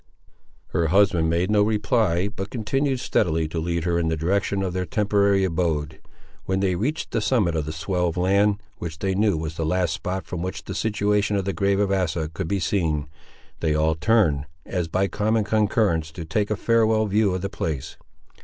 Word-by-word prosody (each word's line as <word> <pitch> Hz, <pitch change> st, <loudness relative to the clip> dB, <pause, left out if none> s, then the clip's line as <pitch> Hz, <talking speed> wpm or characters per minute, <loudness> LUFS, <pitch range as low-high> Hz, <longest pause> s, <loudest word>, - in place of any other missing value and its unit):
Her 85 Hz, -, +1 dB
husband 90 Hz, -2 st, +3 dB
made 85 Hz, +4 st, +1 dB
no 105 Hz, -1 st, +4 dB
reply, 105 Hz, -3 st, +1 dB
but 100 Hz, -1 st, -6 dB
continued 135 Hz, +3 st, -1 dB
steadily 80 Hz, -9 st, +1 dB
to 80 Hz, -, -3 dB
lead 85 Hz, 0 st, -1 dB
her 85 Hz, 0 st, +1 dB
in 85 Hz, -, 0 dB
the 80 Hz, 0 st, 0 dB
direction 95 Hz, +4 st, 0 dB
of 90 Hz, -2 st, -2 dB
their 90 Hz, 0 st, -1 dB
temporary 100 Hz, -3 st, +2 dB
abode. 80 Hz, -6 st, -1 dB, 0.4 s
When 95 Hz, 0 st, 0 dB
they 95 Hz, -1 st, +1 dB
reached 125 Hz, -, -2 dB
the 115 Hz, -, 0 dB
summit 105 Hz, -7 st, +1 dB
of 80 Hz, -1 st, -2 dB
the -, -, -2 dB
swell 90 Hz, +3 st, -1 dB
of 85 Hz, -, -3 dB
land, 100 Hz, +3 st, +3 dB, 0.2 s
which 85 Hz, -2 st, -5 dB
they 95 Hz, +3 st, -1 dB
knew 100 Hz, -2 st, +2 dB
was 80 Hz, 0 st, -5 dB
the 80 Hz, -, -1 dB
last 90 Hz, 0 st, +1 dB
spot 95 Hz, -1 st, -4 dB
from 85 Hz, 0 st, -5 dB
which 95 Hz, +1 st, -4 dB
the 95 Hz, -, -6 dB
situation 105 Hz, 0 st, +1 dB
of 100 Hz, -2 st, -1 dB
the 100 Hz, -, -1 dB
grave 100 Hz, 0 st, +1 dB
of 100 Hz, -1 st, +1 dB
Asa 85 Hz, -4 st, 0 dB
could 85 Hz, +1 st, -4 dB
be 100 Hz, +3 st, 0 dB
seen, 80 Hz, -5 st, 0 dB, 0.5 s
they 80 Hz, -2 st, +1 dB
all 80 Hz, +1 st, +2 dB
turned, 80 Hz, -5 st, +2 dB, 0.2 s
as 90 Hz, -3 st, -2 dB
by 95 Hz, +4 st, +1 dB
common 110 Hz, +2 st, 0 dB
concurrence, 105 Hz, -6 st, +1 dB
to 85 Hz, -1 st, -7 dB
take 100 Hz, +6 st, -1 dB
a 105 Hz, -, +1 dB
farewell 110 Hz, 0 st, +2 dB
view 105 Hz, -2 st, +2 dB
of 95 Hz, -, -4 dB
the -, -, 0 dB
place. 80 Hz, -6 st, -4 dB
95 Hz, 200 wpm, -24 LUFS, 80-105 Hz, 0.5 s, no